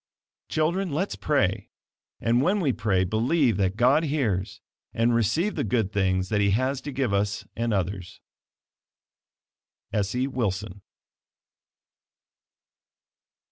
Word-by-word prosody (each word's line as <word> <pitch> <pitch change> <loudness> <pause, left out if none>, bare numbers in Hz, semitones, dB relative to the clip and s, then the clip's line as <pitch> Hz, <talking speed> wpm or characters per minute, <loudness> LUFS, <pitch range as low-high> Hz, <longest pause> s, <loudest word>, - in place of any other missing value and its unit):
Children, 175 +5 0
let's 175 +8 -1
pray; 140 -11 0 0.5
and 120 +2 +2
when 185 +8 +2
we 145 -9 +1
pray, 100 -6 +1
believe 115 - +1
that 95 -1 0
God 130 +6 +4
hears, 115 -11 -1 0.4
and 115 +1 +2
receive 115 - +1
the - - -2
good 105 -2 0
things 95 -2 +1
that 105 -1 +1
he 100 - +3
has 130 +2 -1
to 145 - -6
give 130 -6 -1
us 100 0 -1
and 115 0 -1
others. 95 -2 -3 1.7
Essie 105 +5 0
Wilson. 105 -6 -3
115 Hz, 115 wpm, -26 LUFS, 100-140 Hz, 1.7 s, God